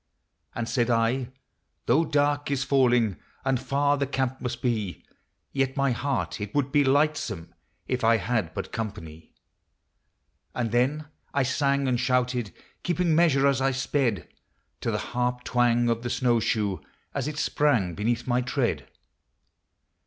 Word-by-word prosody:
And 115 Hz, -1 st, -2 dB
said 120 Hz, 0 st, +1 dB
I, 120 Hz, +2 st, +1 dB, 0.3 s
" -, -, -50 dB
Though 150 Hz, +8 st, +3 dB
dark 145 Hz, -1 st, +1 dB
is 140 Hz, -1 st, 0 dB
falling, 125 Hz, -8 st, +3 dB, 0.3 s
And 135 Hz, -2 st, +2 dB
far 145 Hz, +2 st, +1 dB
the 140 Hz, 0 st, -1 dB
camp 130 Hz, -1 st, -2 dB
must 125 Hz, -1 st, -4 dB
be, 110 Hz, -8 st, -2 dB, 0.5 s
Yet 135 Hz, 0 st, -1 dB
my 140 Hz, -1 st, +2 dB
heart 135 Hz, -2 st, -2 dB
it 105 Hz, +4 st, -5 dB
would 140 Hz, -2 st, +1 dB
be 145 Hz, 0 st, +4 dB
lightsome 135 Hz, -, 0 dB, 0.3 s
If 125 Hz, -2 st, -1 dB
I 115 Hz, 0 st, +5 dB
had 105 Hz, -4 st, -1 dB
but -, -, -5 dB
company." 80 Hz, -9 st, -6 dB, 1.2 s
And 120 Hz, -3 st, -1 dB
then 135 Hz, +6 st, +1 dB, 0.3 s
I 140 Hz, -, +3 dB
sang 140 Hz, +1 st, +1 dB
and 125 Hz, -2 st, +1 dB
shouted, 125 Hz, -3 st, 0 dB, 0.3 s
Keeping 175 Hz, -1 st, +1 dB
measure, 155 Hz, -4 st, +4 dB
as 140 Hz, -1 st, +3 dB
I 135 Hz, -, +3 dB
sped, 135 Hz, -3 st, 0 dB, 0.5 s
To -, -, -2 dB
the -, -, 0 dB, 0.2 s
harp 125 Hz, 0 st, -1 dB
twang 120 Hz, -1 st, +2 dB
of 115 Hz, -1 st, 0 dB
the 120 Hz, -, -3 dB
snow 120 Hz, -1 st, +2 dB
shoe 105 Hz, -3 st, 0 dB, 0.3 s
As 140 Hz, -1 st, -2 dB
it 150 Hz, -1 st, -4 dB
sprang 125 Hz, -, +1 dB
beneath 115 Hz, +5 st, -1 dB
my 125 Hz, 0 st, +1 dB
tread. 125 Hz, -, -1 dB
125 Hz, 155 wpm, -26 LUFS, 115-140 Hz, 1.2 s, I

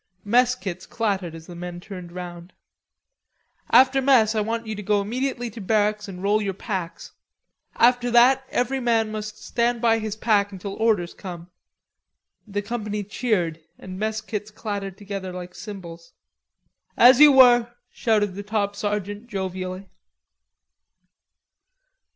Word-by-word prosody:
Mess 245 Hz, +4 st, +3 dB
kits 185 Hz, -6 st, -7 dB
clattered 195 Hz, -7 st, -2 dB
as 160 Hz, -1 st, -11 dB
the 175 Hz, -, -10 dB
men 175 Hz, 0 st, -7 dB
turned 180 Hz, -2 st, -9 dB
round. 175 Hz, 0 st, -8 dB, 1.2 s
"After 265 Hz, +1 st, +5 dB
mess 250 Hz, -5 st, +4 dB
I 215 Hz, -, +1 dB
want 230 Hz, +2 st, -2 dB
you 220 Hz, -, -4 dB
to 210 Hz, -, -6 dB
go 205 Hz, +1 st, +1 dB
immediately 245 Hz, +3 st, -3 dB
to 225 Hz, +1 st, -9 dB
barracks 210 Hz, +1 st, +1 dB
and 185 Hz, -1 st, -8 dB
roll 210 Hz, +2 st, +2 dB
your 195 Hz, -2 st, -2 dB
packs. 190 Hz, -5 st, -5 dB, 0.6 s
After 245 Hz, +1 st, +3 dB
that 250 Hz, +3 st, +5 dB
every 255 Hz, +2 st, 0 dB
man 225 Hz, -3 st, +1 dB
must 215 Hz, 0 st, -6 dB
stand 235 Hz, 0 st, 0 dB
by 225 Hz, -1 st, +3 dB
his 215 Hz, -1 st, -4 dB
pack 210 Hz, -2 st, +1 dB
until 195 Hz, +1 st, -6 dB
orders 210 Hz, -6 st, +1 dB
come." 175 Hz, -2 st, -9 dB, 1.0 s
The 205 Hz, 0 st, -3 dB
company 210 Hz, -2 st, -3 dB
cheered 195 Hz, -6 st, -1 dB, 0.2 s
and 185 Hz, 0 st, -9 dB
mess 220 Hz, +1 st, -2 dB
kits 215 Hz, -1 st, -5 dB
clattered 200 Hz, -3 st, -5 dB
together 195 Hz, -2 st, -6 dB
like 180 Hz, 0 st, -8 dB
cymbals. 175 Hz, -6 st, -10 dB, 0.8 s
"As 245 Hz, +2 st, +7 dB
you 300 Hz, -1 st, +9 dB
were," 240 Hz, -2 st, +6 dB, 0.2 s
shouted 210 Hz, -4 st, +1 dB
the 200 Hz, -, -6 dB
top 205 Hz, -1 st, -2 dB
sergeant 205 Hz, +1 st, -3 dB
jovially. 190 Hz, -2 st, -5 dB
210 Hz, 140 wpm, -24 LUFS, 190-230 Hz, 1.2 s, you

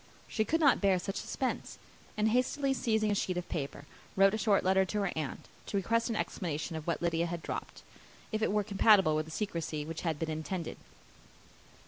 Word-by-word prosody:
She 220 Hz, -, 0 dB
could 325 Hz, +7 st, +1 dB
not 285 Hz, -5 st, +5 dB
bear 195 Hz, -2 st, +4 dB
such 195 Hz, +2 st, -4 dB
suspense; 260 Hz, -, -3 dB, 0.4 s
and 215 Hz, +1 st, +3 dB
hastily 260 Hz, +4 st, +1 dB
seizing 220 Hz, -4 st, +1 dB
a -, -, +3 dB
sheet 185 Hz, -2 st, -1 dB
of 180 Hz, -, -3 dB
paper, 140 Hz, -1 st, -4 dB, 0.3 s
wrote 195 Hz, +1 st, +5 dB
a -, -, +1 dB
short 210 Hz, -3 st, +3 dB
letter 190 Hz, +1 st, +4 dB
to 205 Hz, +2 st, -2 dB
her 195 Hz, -, 0 dB
aunt, 155 Hz, -4 st, -4 dB, 0.2 s
to 200 Hz, -, -1 dB
request 230 Hz, +5 st, +1 dB
an 230 Hz, -, -1 dB
explanation 165 Hz, -5 st, -3 dB
of 160 Hz, 0 st, -6 dB
what 170 Hz, -, -1 dB
Lydia 170 Hz, 0 st, +1 dB
had 170 Hz, -1 st, -5 dB
dropped, -, -, -6 dB, 0.5 s
if 215 Hz, 0 st, -1 dB
it 220 Hz, -, +2 dB
were 210 Hz, 0 st, +2 dB
compatible 200 Hz, -5 st, +5 dB
with 155 Hz, 0 st, 0 dB
the 160 Hz, -, -11 dB
secrecy 165 Hz, -6 st, -3 dB
which 160 Hz, +1 st, -5 dB
had 165 Hz, -3 st, -1 dB
been 160 Hz, +1 st, -2 dB
intended. 160 Hz, +2 st, -4 dB
190 Hz, 200 wpm, -31 LUFS, 165-215 Hz, 0.5 s, not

